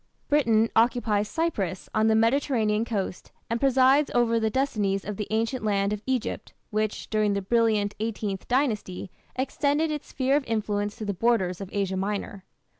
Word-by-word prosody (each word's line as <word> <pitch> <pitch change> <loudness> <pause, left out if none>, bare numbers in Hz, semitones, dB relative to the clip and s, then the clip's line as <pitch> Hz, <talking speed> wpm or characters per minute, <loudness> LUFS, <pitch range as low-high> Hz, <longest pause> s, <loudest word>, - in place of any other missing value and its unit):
Britain 230 -7 +3
occupies 225 -3 +2
Cyprus 200 - -2
on 220 0 +3
the 220 - +4
Mediterranean 225 -2 +2
coast, 200 -6 -4 0.2
and 230 - 0
presides 270 +2 +4
over 230 -1 +3
the 220 0 +1
destinies 210 -7 0
of 210 - -4
the 210 0 -4
ancient 225 +3 -1
land 200 -1 +1
of 210 - -4
Egypt, 260 -3 -2 0.2
which, 215 0 -2
during 215 -1 +2
the 200 - -1
brilliant 215 -1 +2
Eighteenth 210 -3 -3
Dynasty, 220 -9 -1 0.2
extended 285 +4 0
its 300 -1 -4
sphere 270 +1 +1
of 290 - +2
influence 210 -2 -1
to 215 - -6
the 200 - -1
borders 190 -3 +1
of 195 - -6
Asia 195 -2 -1
Minor. 200 0 -3
220 Hz, 165 wpm, -26 LUFS, 205-255 Hz, 0.2 s, the